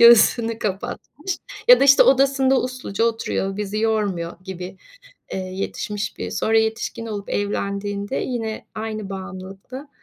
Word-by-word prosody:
göğsünü 230 Hz, -1 st, +7 dB
kapatmış 240 Hz, -, -4 dB, 0.3 s
ya -, -, +9 dB
da -, -, +6 dB
işte 275 Hz, 0 st, +8 dB
odasında 270 Hz, 0 st, +4 dB
usluca 250 Hz, -4 st, -2 dB
oturuyor, 215 Hz, -4 st, -1 dB
bizi 210 Hz, 0 st, -2 dB
yormuyor 205 Hz, -6 st, 0 dB
gibi, 185 Hz, 0 st, -7 dB, 0.6 s
eee, -, -, -2 dB
yetişmiş 195 Hz, +2 st, -4 dB
biri -, -, -4 dB
sonra 225 Hz, 0 st, +2 dB
yetişkin 220 Hz, +1 st, -1 dB
olup 205 Hz, -2 st, -5 dB
evlendiğinde 200 Hz, +2 st, -2 dB
yine 225 Hz, -3 st, -3 dB
aynı 215 Hz, -2 st, -4 dB
bağımlılıkta 195 Hz, +8 st, -8 dB
215 Hz, 125 wpm, -22 LUFS, 195-235 Hz, 0.6 s, ya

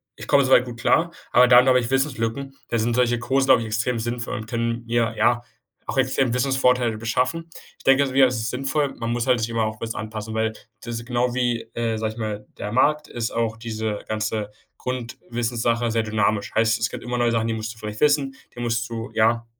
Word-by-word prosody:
ich -, -, -10 dB
komme 140 Hz, -1 st, +5 dB
soweit 130 Hz, -1 st, +6 dB
gut 120 Hz, -2 st, -8 dB
klar.“ 165 Hz, +7 st, +2 dB, 0.2 s
Aber 125 Hz, 0 st, +7 dB
dann 125 Hz, +1 st, +7 dB
habe 130 Hz, -1 st, +5 dB
ich 120 Hz, +1 st, -4 dB
Wissenslücken. 135 Hz, -1 st, -1 dB, 0.2 s
Da 120 Hz, -, 0 dB
sind 115 Hz, +1 st, 0 dB
solche 120 Hz, -1 st, +2 dB
Kurse 135 Hz, +3 st, +1 dB
glaube 130 Hz, -3 st, +6 dB
ich, 115 Hz, -, -4 dB
extrem 115 Hz, +2 st, -1 dB
sinnvoll 120 Hz, +1 st, -3 dB
und 110 Hz, -1 st, -7 dB
können 115 Hz, 0 st, -2 dB
mir, 115 Hz, -1 st, +1 dB
ja, 120 Hz, 0 st, +2 dB, 0.4 s
auch -, -, -4 dB
extrem 130 Hz, -1 st, +2 dB
Wissensvorteile 125 Hz, -3 st, +2 dB
beschaffen. 125 Hz, +9 st, -1 dB, 0.3 s
Ich -, -, -18 dB
denke 135 Hz, +1 st, +5 dB
mir, 135 Hz, 0 st, +6 dB
es 125 Hz, -, -2 dB
ist 110 Hz, 0 st, -2 dB
sinnvoll. 135 Hz, +2 st, -1 dB
Man 115 Hz, 0 st, -3 dB
muss 120 Hz, +1 st, -1 dB
halt 125 Hz, -2 st, +3 dB
sich 110 Hz, -, -1 dB
immer 115 Hz, -1 st, 0 dB
auch 110 Hz, 0 st, -4 dB
bisschen 115 Hz, 0 st, -4 dB
anpassen, 110 Hz, 0 st, -6 dB
weil 110 Hz, 0 st, 0 dB, 0.3 s
das 120 Hz, 0 st, -5 dB
ist 115 Hz, -, -10 dB
genau 120 Hz, 0 st, 0 dB
wie, 120 Hz, -2 st, 0 dB
äh, 115 Hz, -1 st, -1 dB
sage 110 Hz, 0 st, -2 dB
ich 115 Hz, -, -11 dB
mal, 105 Hz, -1 st, -4 dB
der 105 Hz, -, -4 dB
Markt 150 Hz, +5 st, +2 dB
ist 115 Hz, -1 st, -3 dB
auch 115 Hz, -1 st, -1 dB
diese 110 Hz, -2 st, -3 dB
ganze 110 Hz, -1 st, -2 dB, 0.3 s
Grundwissenssache 120 Hz, -1 st, -2 dB
sehr 115 Hz, 0 st, +1 dB
dynamisch, 105 Hz, -1 st, 0 dB
heißt, 115 Hz, +1 st, +3 dB
es 115 Hz, -, 0 dB
gibt -, -, -7 dB
immer 125 Hz, 0 st, -3 dB
neue 120 Hz, -1 st, +2 dB
Sachen, 115 Hz, -1 st, 0 dB
die -, -, 0 dB
musst 110 Hz, 0 st, -4 dB
du -, -, -22 dB
vielleicht 105 Hz, -1 st, -6 dB
wissen, 145 Hz, -2 st, +2 dB, 0.2 s
die 120 Hz, -, -6 dB
musst 120 Hz, 0 st, -1 dB
du 115 Hz, +1 st, -5 dB
ja, 115 Hz, +1 st, +2 dB
115 Hz, 225 wpm, -23 LUFS, 110-125 Hz, 0.4 s, Aber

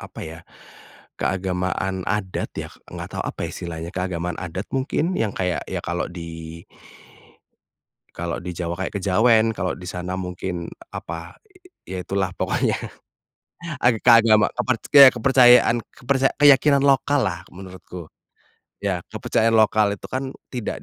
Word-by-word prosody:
apa -, -, -10 dB
ya 80 Hz, +1 st, -9 dB, 0.8 s
keagamaan 95 Hz, 0 st, -2 dB
adat 95 Hz, -2 st, -3 dB
ya -, -, -6 dB, 0.2 s
nggak -, -, -6 dB
tahu -, -, -4 dB
apa -, -, -6 dB
ya -, -, -7 dB
istilahnya? 85 Hz, -1 st, -6 dB
Keagamaan 90 Hz, -2 st, -3 dB
adat 95 Hz, +2 st, -6 dB
mungkin 150 Hz, +6 st, -1 dB
yang 110 Hz, -3 st, 0 dB
kayak 90 Hz, -2 st, -2 dB
ya -, -, -4 dB
kalau 85 Hz, 0 st, -2 dB
di 85 Hz, -1 st, -8 dB, 1.5 s
kalau 85 Hz, 0 st, -4 dB
di 90 Hz, 0 st, -6 dB
Jawa 85 Hz, 0 st, -3 dB
kayak 95 Hz, +2 st, -4 dB
kejawen 110 Hz, +4 st, +4 dB
kalau 90 Hz, -1 st, -1 dB
di 90 Hz, 0 st, -9 dB
sana 90 Hz, +1 st, -4 dB
mungkin 90 Hz, -1 st, -5 dB, 0.2 s
apa? 85 Hz, 0 st, -7 dB, 0.5 s
Ya 90 Hz, -1 st, -5 dB
itulah 95 Hz, -1 st, -1 dB
pokoknya, -, -, 0 dB, 1.1 s
aga 120 Hz, -3 st, +4 dB
keagama 115 Hz, -3 st, +6 dB
keperc 125 Hz, -1 st, 0 dB
ya 140 Hz, -2 st, +11 dB
kepercayaan 120 Hz, -1 st, +5 dB
keperca 135 Hz, +1 st, +1 dB
keyakinan 140 Hz, 0 st, +6 dB
lokallah 135 Hz, -, +1 dB
menurutku, 90 Hz, -2 st, -10 dB, 0.7 s
ya 100 Hz, -3 st, 0 dB
kepercayaan 115 Hz, 0 st, 0 dB
lokal 110 Hz, -2 st, +3 dB
itu -, -, -17 dB
kan 130 Hz, +1 st, -4 dB, 0.2 s
tidak 120 Hz, -5 st, -5 dB
95 Hz, 135 wpm, -22 LUFS, 90-120 Hz, 1.5 s, ya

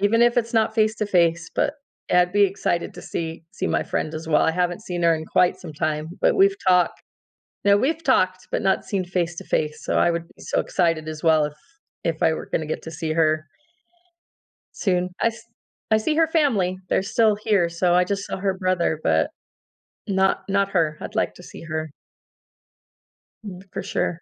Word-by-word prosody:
even 220 Hz, +4 st, +3 dB
if 240 Hz, 0 st, +4 dB
it's 230 Hz, -1 st, 0 dB
not 220 Hz, 0 st, +2 dB
face-to-face, 195 Hz, -7 st, +1 dB
but 285 Hz, -, +1 dB, 0.4 s
yeah 180 Hz, -, +6 dB
I'd 180 Hz, 0 st, -3 dB
be 205 Hz, 0 st, +4 dB
excited 185 Hz, -3 st, -1 dB
to -, -, -10 dB
see 165 Hz, -1 st, -5 dB
see -, -, -3 dB
my -, -, +1 dB
friend 155 Hz, -, -3 dB
as 160 Hz, +1 st, -6 dB
well, 150 Hz, -, +4 dB
I -, -, +3 dB
haven't 180 Hz, +3 st, -1 dB
seen 175 Hz, -3 st, -4 dB
her 165 Hz, -1 st, +5 dB
in 160 Hz, 0 st, -5 dB
quite 180 Hz, -, +2 dB
some 165 Hz, -4 st, -8 dB
time, 150 Hz, +1 st, -2 dB
but -, -, +3 dB
we've 395 Hz, +1 st, +4 dB
talk 180 Hz, -1 st, +4 dB, 0.7 s
now, 200 Hz, 0 st, +6 dB
we've 320 Hz, +9 st, 0 dB
talked 185 Hz, -8 st, +1 dB
but -, -, -1 dB
not 190 Hz, 0 st, +1 dB
seen 190 Hz, -3 st, -2 dB
face-to-face, 170 Hz, -4 st, -2 dB
so, -, -, 0 dB
I 175 Hz, -, +4 dB
would 170 Hz, 0 st, -3 dB
be -, -, -18 dB
so -, -, -1 dB
excited 165 Hz, -4 st, 0 dB
as 155 Hz, -1 st, -6 dB
well 160 Hz, -2 st, +4 dB
if 150 Hz, -, -8 dB, 0.5 s
if 165 Hz, -1 st, -1 dB
I 160 Hz, -, +4 dB
were -, -, -6 dB
gonna 155 Hz, -, -1 dB
get 155 Hz, -, -4 dB
to 160 Hz, -, -6 dB
see 155 Hz, 0 st, -3 dB
her 155 Hz, -1 st, +1 dB, 1.3 s
soon, 180 Hz, -2 st, 0 dB
I -, -, +4 dB
s 230 Hz, +1 st, -6 dB, 0.5 s
I 220 Hz, -, +6 dB
see 300 Hz, +8 st, 0 dB
her 325 Hz, -, +4 dB
family, 215 Hz, -, +1 dB
they're -, -, +2 dB
still 215 Hz, +1 st, +3 dB
here, 205 Hz, -5 st, +1 dB
so, 175 Hz, +1 st, +1 dB
I 180 Hz, -, +5 dB
just 195 Hz, +2 st, -3 dB
saw -, -, -4 dB
her 190 Hz, 0 st, -1 dB
brother 185 Hz, -4 st, 0 dB
but 80 Hz, 0 st, +2 dB, 0.8 s
not 190 Hz, -1 st, +1 dB
not 200 Hz, 0 st, +1 dB
her, 160 Hz, -4 st, +1 dB
I'd 215 Hz, -, -8 dB
like 220 Hz, -, 0 dB
to 180 Hz, -, -13 dB
see -, -, -11 dB
her. 155 Hz, -2 st, -4 dB, 1.5 s
Mm, 185 Hz, -2 st, -8 dB
for -, -, -4 dB
sure. 165 Hz, -1 st, -2 dB
180 Hz, 200 wpm, -23 LUFS, 165-205 Hz, 1.5 s, yeah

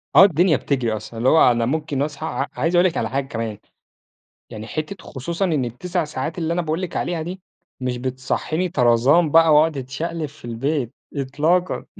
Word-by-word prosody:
آه، -, -, +10 dB
الدنيا 175 Hz, -2 st, +3 dB
بتجري 125 Hz, -5 st, -1 dB
أصلًا. 110 Hz, +2 st, -8 dB
اللي 125 Hz, +3 st, +2 dB
هو 160 Hz, -5 st, +6 dB
أنا 120 Hz, -1 st, +1 dB
ممكن 150 Hz, +1 st, -1 dB
اصحى 150 Hz, +1 st, -3 dB
عا 140 Hz, -3 st, -2 dB
عايز 165 Hz, +3 st, 0 dB
اقول 175 Hz, +1 st, +5 dB
لِك 170 Hz, -, -3 dB
على -, -, -1 dB
حاجة 135 Hz, +1 st, -1 dB
كمان، 115 Hz, -3 st, -4 dB, 0.9 s
يعني 110 Hz, +1 st, -8 dB
حِتة 155 Hz, -, -5 dB
خصوصًا 170 Hz, +8 st, -3 dB
إن 150 Hz, -7 st, 0 dB
ال9 175 Hz, +9 st, -2 dB
ساعات 150 Hz, +2 st, -4 dB
اللي 165 Hz, -1 st, -1 dB
أنا 175 Hz, -, 0 dB
باقول 160 Hz, +2 st, -2 dB
لِك 180 Hz, -, -4 dB
عليها 170 Hz, -2 st, -2 dB
دي، 180 Hz, +3 st, -6 dB, 0.4 s
مش 125 Hz, -1 st, -2 dB
بتصحّيني 130 Hz, +7 st, -2 dB
طرازان 135 Hz, +5 st, +3 dB
بقى، 165 Hz, -1 st, +6 dB
واقعُد 155 Hz, 0 st, +4 dB
اتشقلب 155 Hz, +5 st, -4 dB
في 145 Hz, -4 st, -12 dB
البيت 125 Hz, +2 st, -2 dB, 0.2 s
إطلاقًا. 150 Hz, +7 st, 0 dB
150 Hz, 185 wpm, -21 LUFS, 130-165 Hz, 0.9 s, آه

